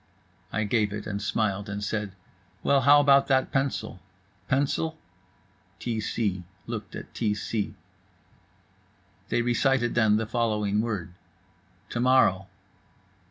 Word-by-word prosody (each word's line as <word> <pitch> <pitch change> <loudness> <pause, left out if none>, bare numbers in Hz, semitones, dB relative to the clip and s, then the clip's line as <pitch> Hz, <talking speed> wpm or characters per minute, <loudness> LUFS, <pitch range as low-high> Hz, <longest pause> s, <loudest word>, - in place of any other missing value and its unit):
I 110 - 0
gave 105 -1 +1
it, 105 -1 -4
smiled 100 0 -1
and 100 0 -4
said: 105 -2 -2 0.5
"Well, 140 -1 +4
how 145 +2 +7
about 140 -1 +5
that 130 -1 +2
pencil?" 135 0 -1 0.5
"Pencil?" 145 +4 0 0.8
T 115 +2 -3
c 100 -4 -2 0.2
looked 110 -3 -6
at - - -9
T 105 -3 0
c. 105 0 -3 1.5
They 120 - +1
recited 120 0 +2
then 110 -3 +4
the 110 - -1
following 105 -3 0
word: 105 -7 -3 0.8
"To 120 - -3
morrow." 120 -7 +4
110 Hz, 115 wpm, -27 LUFS, 105-130 Hz, 1.5 s, how